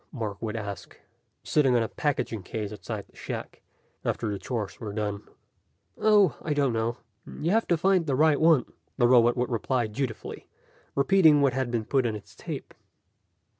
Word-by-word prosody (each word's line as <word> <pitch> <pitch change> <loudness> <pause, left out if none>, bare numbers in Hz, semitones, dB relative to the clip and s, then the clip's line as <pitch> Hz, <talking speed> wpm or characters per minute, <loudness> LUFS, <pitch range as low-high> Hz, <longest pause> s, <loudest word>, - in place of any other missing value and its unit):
Mark 110 -8 -5
would 110 -1 -3
ask, 100 -3 -6 0.4
sitting 135 -5 +3
on 120 - +3
a - - -2
packing 130 -7 -2
case 105 +3 -5
outside 105 - -6
the - - -27
shack, - - -7 0.4
after 110 -3 -1
the 100 - -4
chores 115 -5 -4
were 105 -3 -5
done. 105 -1 -2 0.7
"Oh, 205 - +4
I 150 -2 -2
don't 140 -4 +2
know. 115 +1 -1 0.4
You 165 +4 0
have 225 +2 +2
to 170 - +2
find 185 -1 +2
the 135 - +1
right 155 +1 +3
one." 160 -6 +5 0.3
The 120 -3 +4
robot 120 0 +5
would 125 +1 -1
reply 120 +1 0
dutifully, 110 +2 -5 0.5
repeating 150 +1 +5
what 135 -3 +3
had 130 -1 -1
been 115 -2 -1
put 130 -1 +1
on 110 - -2
its 105 - -11
tape. - - -7
125 Hz, 175 wpm, -27 LUFS, 110-150 Hz, 0.7 s, one